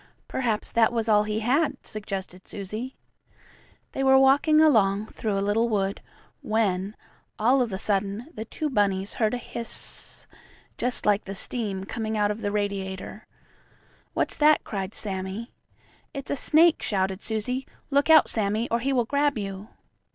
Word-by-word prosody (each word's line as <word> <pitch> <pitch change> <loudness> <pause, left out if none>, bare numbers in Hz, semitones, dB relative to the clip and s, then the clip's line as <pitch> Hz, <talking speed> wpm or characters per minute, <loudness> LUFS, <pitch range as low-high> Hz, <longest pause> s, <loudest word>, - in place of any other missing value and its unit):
"Perhaps 230 -5 -2
that 230 0 +3
was 230 -1 0
all 210 -1 +4
he 215 +1 -2
had," 280 +8 +1
suggested 195 -3 -6
Susie. 215 +6 -6 1.0
They 270 - -2
were 265 0 +6
walking 280 +4 +5
along, 215 -9 +4
through 215 -2 -3
a 195 - 0
little 225 +3 +1
wood, 200 -2 -1 0.4
when, 205 -2 0 0.4
all 250 +5 +3
of 240 -3 -1
a 190 - -2
sudden, 200 +2 -1
the 220 - -5
two 305 +7 -4
bunnies 200 -6 0
heard 220 +1 0
a - - -2
hiss, 235 -1 -5 0.5
just 245 0 0
like 210 0 +2
the 195 - -6
steam 200 -3 -3
coming 220 +1 -3
out 205 0 +2
of 210 +2 -6
the 205 - -1
radiator. 200 0 -4 0.9
"What's - - -1
that?" 300 0 +4
cried 195 -1 -5
Sammie. 195 +3 -4 0.6
"It's 275 -1 -5
a - - +1
snake!" 320 +4 +4
shouted 190 -1 -1
Susie. 250 +4 -3 0.2
"Look 280 +3 +2
out, 315 -2 +7
Sammie, 215 +2 -1
or 235 - +2
he 270 +3 -1
will 245 -3 +2
grab 285 +1 +1
you." 195 0 -5
215 Hz, 160 wpm, -26 LUFS, 200-250 Hz, 1.0 s, out